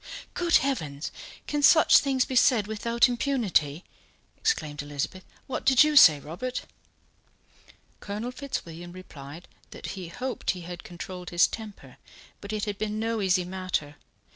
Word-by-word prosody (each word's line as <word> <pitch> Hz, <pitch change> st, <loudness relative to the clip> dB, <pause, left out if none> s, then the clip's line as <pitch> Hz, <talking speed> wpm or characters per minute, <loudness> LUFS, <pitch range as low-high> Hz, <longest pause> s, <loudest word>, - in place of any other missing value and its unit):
"Good 345 Hz, -1 st, +1 dB
heavens! 155 Hz, -, -3 dB, 0.3 s
can 295 Hz, 0 st, -2 dB
such 315 Hz, +3 st, +7 dB
things 265 Hz, -2 st, +1 dB
be 260 Hz, -, -5 dB
said 240 Hz, -4 st, +4 dB
without 230 Hz, +3 st, +2 dB
impunity?" 225 Hz, -, 0 dB, 0.5 s
exclaimed 150 Hz, -, -1 dB
Elizabeth. 145 Hz, +6 st, -4 dB, 0.2 s
"What 265 Hz, -, -4 dB
did 265 Hz, +1 st, +6 dB
you 305 Hz, 0 st, +1 dB
say, 155 Hz, -, +9 dB
Robert?" 190 Hz, -, -5 dB, 1.4 s
Colonel 210 Hz, +4 st, -5 dB
Fitzwilliam 175 Hz, -, -6 dB
replied 165 Hz, -3 st, -11 dB, 0.2 s
that -, -, -10 dB
he 185 Hz, -3 st, -7 dB
hoped 250 Hz, +9 st, -5 dB
he 180 Hz, -, 0 dB
had 175 Hz, 0 st, -8 dB
controlled 180 Hz, +1 st, -8 dB
his 175 Hz, 0 st, +4 dB
temper, 205 Hz, -, -8 dB, 0.4 s
but 200 Hz, -, -7 dB
it 215 Hz, -1 st, -2 dB
had 205 Hz, -1 st, -4 dB
been 215 Hz, 0 st, -2 dB
no 225 Hz, 0 st, -1 dB
easy 185 Hz, -2 st, +2 dB
matter. 180 Hz, -5 st, -3 dB
200 Hz, 140 wpm, -27 LUFS, 170-250 Hz, 1.4 s, say